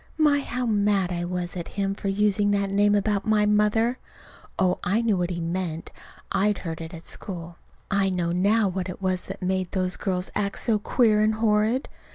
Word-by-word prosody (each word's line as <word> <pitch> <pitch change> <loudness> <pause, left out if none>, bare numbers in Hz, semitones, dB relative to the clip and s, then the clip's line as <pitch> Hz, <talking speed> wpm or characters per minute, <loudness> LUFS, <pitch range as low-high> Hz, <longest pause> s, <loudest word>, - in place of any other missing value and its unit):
My, 300 -2 +4
how 250 -2 -3
mad 205 -4 +2
I 175 0 -2
was 180 0 -3
at 170 -2 -5
him 195 -1 0
for 200 - -6
using 205 +1 +2
that 200 -1 +1
name 205 +1 +3
about 205 0 +1
my 215 -1 +3
mother! 210 +4 +2 0.6
Oh, 185 -1 +2
I 210 +6 +1
knew 220 -3 +2
what 175 -1 -1
he 175 -1 -3
meant. 170 -1 -3 0.4
I'd 205 0 +2
heard 165 0 -4
it 160 0 -7
at 165 -1 -10
school. 170 -3 -6 0.3
(I 195 -1 +2
know 175 -2 -1
now 200 +5 +3
what 185 0 -3
it 180 - -7
was 185 -1 -1
that 195 0 -7
made 185 -1 -1
those 185 -2 -1
girls 185 -2 -2
act 200 -1 -1
so 220 -3 +1
queer 215 -1 +3
and 215 0 +2
horrid.) 220 +3 +1
195 Hz, 200 wpm, -25 LUFS, 180-210 Hz, 0.6 s, My